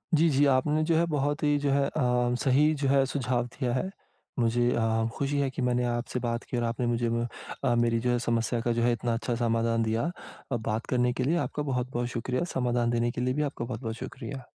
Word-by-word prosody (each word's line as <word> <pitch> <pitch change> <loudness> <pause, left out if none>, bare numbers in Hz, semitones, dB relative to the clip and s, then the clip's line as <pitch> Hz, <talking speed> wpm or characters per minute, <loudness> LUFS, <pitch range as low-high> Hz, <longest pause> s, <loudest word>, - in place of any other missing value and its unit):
जी, 160 +2 +4
जी 145 0 +3
आपने 150 +4 +2
जो 165 +1 +2
है 170 - +3
बहुत 145 +1 0
ही 145 -1 +3
जो 140 - +3
है 140 0 +3
अ, 125 -3 +1
सही 145 +4 +4
जो 140 - +2
है 135 0 +4
सुझाव 125 -3 -1
दिया 120 0 -3
है। 130 +9 -1 0.5
मुझे 120 +1 +2
अ, 115 -1 +1
खुशी 140 +1 -1
है 140 -1 +1
कि 130 - -5
मैंने 125 0 +1
आपसे 120 +1 -2
बात 120 -1 -2
की 125 - -4
और 120 - 0
आपने 115 +1 -1
मुझे 120 0 0
ब 115 +1 0 0.4
अ, 120 - +3
मेरी 115 -1 +2
जो 125 +1 0
है 120 - +1
समस्या 115 0 0
का 120 - 0
जो 115 - 0
है 120 - +4
इतना 120 0 -1
अच्छा 120 +1 -1
समाधान 115 -1 +1
दिया। 115 +9 0 0.4
अ, - - +1
बात 110 0 -2
करने 125 -1 +1
के 130 - -2
लिए 165 +6 +2
आपका 150 - -4
बहुत-बहुत 125 -3 -2
शुक्रिया, 125 +4 -2
समाधान 120 -2 +1
देने 120 0 +1
के 125 - -4
लिए 125 +1 +1
भी 150 +3 0
आपका 120 - -5
बहुत-बहुत 115 -1 -4
शुक्रिया। 130 +1 -7
125 Hz, 235 wpm, -28 LUFS, 120-135 Hz, 0.5 s, जी